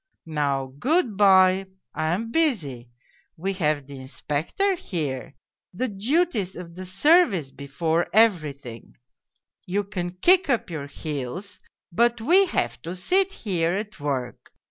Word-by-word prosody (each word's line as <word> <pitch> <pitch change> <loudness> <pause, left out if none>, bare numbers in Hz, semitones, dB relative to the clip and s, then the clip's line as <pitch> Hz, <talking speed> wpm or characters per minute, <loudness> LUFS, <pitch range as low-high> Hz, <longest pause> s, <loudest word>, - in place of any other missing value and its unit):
Now, 140 -4 -2
good 270 - +1
bye. 190 -1 +5 0.3
I - - -2
am 210 +8 -1
busy. 165 - 0 0.5
We 190 +4 -2
have 150 -6 0
the 140 -1 -10
Inspec 145 +3 -4
tor 395 0 +3
here 150 - -4 0.4
the 255 +6 -1
duties 215 - 0
of 170 -1 -9
the 185 +1 -8
service 195 - +3
before 160 +5 -1
everything; 150 - +1 0.7
you 200 +3 0
can 185 -3 -4
kick 355 - +4
up 240 -8 0
your 145 -3 -5
heels, 150 +6 -6 0.3
but 235 +6 +2
we 360 - +4
have 120 - -2
to 170 +6 -6
sit 375 - +2
here 180 - -1
at 210 0 -5
work. 135 -4 -4
180 Hz, 135 wpm, -24 LUFS, 145-225 Hz, 0.7 s, bye